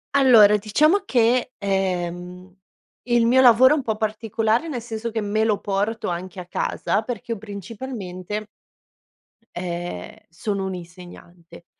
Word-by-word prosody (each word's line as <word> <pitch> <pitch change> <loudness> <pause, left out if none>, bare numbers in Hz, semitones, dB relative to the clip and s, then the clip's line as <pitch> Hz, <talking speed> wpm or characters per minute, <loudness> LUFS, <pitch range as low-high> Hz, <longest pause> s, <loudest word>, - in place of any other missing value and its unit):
Allora, 225 -7 +7
diciamo 305 - +2
che, 245 -1 +2
ehm, 180 -2 -3 0.5
il 240 -1 +2
mio 250 +3 +4
lavoro 255 +3 +7
è - - +1
un - - -1
po' 220 -3 -1
particolare, 220 +4 -1
nel 255 -6 -4
senso 225 0 -5
che 220 -1 -3
me 215 +2 0
lo 215 -2 +1
porto 205 +2 -2
anche 180 +1 -5
a - - -10
casa, 200 +3 -1
perché 235 0 -6
io 230 - -1
principalmente, 205 -1 -7 1.0
ehm, 175 - -5
sono 195 +3 -3
un'insegnante. 175 -1 -10
210 Hz, 130 wpm, -22 LUFS, 180-235 Hz, 1.0 s, Allora